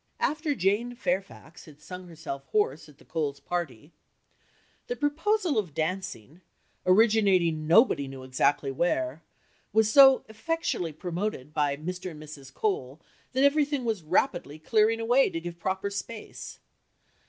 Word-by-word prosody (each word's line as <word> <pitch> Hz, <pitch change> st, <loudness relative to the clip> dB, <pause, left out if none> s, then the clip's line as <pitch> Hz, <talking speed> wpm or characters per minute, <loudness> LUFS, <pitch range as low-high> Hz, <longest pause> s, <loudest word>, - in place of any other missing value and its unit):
After 300 Hz, -1 st, 0 dB
Jane 210 Hz, +5 st, 0 dB
Fairfax 195 Hz, -9 st, -4 dB
had 150 Hz, -2 st, -15 dB
sung 180 Hz, +4 st, -9 dB
herself 160 Hz, -5 st, -7 dB
hoarse 160 Hz, -8 st, 0 dB
at 145 Hz, -, -18 dB
the -, -, -20 dB
Coles' 145 Hz, -3 st, -2 dB
party 155 Hz, -4 st, -4 dB, 1.0 s
"The 485 Hz, -, -2 dB
proposal 325 Hz, -, +1 dB
of 175 Hz, -9 st, -5 dB
dancing 160 Hz, -, -4 dB, 0.5 s
originating 185 Hz, -6 st, +4 dB
nobody 165 Hz, -, +5 dB
exactly 135 Hz, +1 st, 0 dB
knew 135 Hz, -, -11 dB
where 135 Hz, -3 st, 0 dB, 0.5 s
was 220 Hz, 0 st, +3 dB
so 270 Hz, -2 st, +8 dB
effectually 220 Hz, -, -2 dB
promoted 170 Hz, -2 st, -4 dB
by 145 Hz, -2 st, +1 dB
Mr. 180 Hz, +4 st, -5 dB
and 155 Hz, -2 st, -10 dB
Mrs. 140 Hz, -3 st, -11 dB
Cole 140 Hz, -6 st, -2 dB, 0.3 s
that 260 Hz, +1 st, +2 dB
everything 285 Hz, -2 st, +2 dB
was 220 Hz, -5 st, -1 dB
rapidly 160 Hz, -, 0 dB
clearing 215 Hz, +7 st, +2 dB
away, 245 Hz, +4 st, +3 dB
to 165 Hz, -, -4 dB
give 170 Hz, 0 st, -7 dB
proper 190 Hz, +3 st, -2 dB
space. 215 Hz, +2 st, -7 dB
180 Hz, 135 wpm, -27 LUFS, 150-225 Hz, 1.0 s, so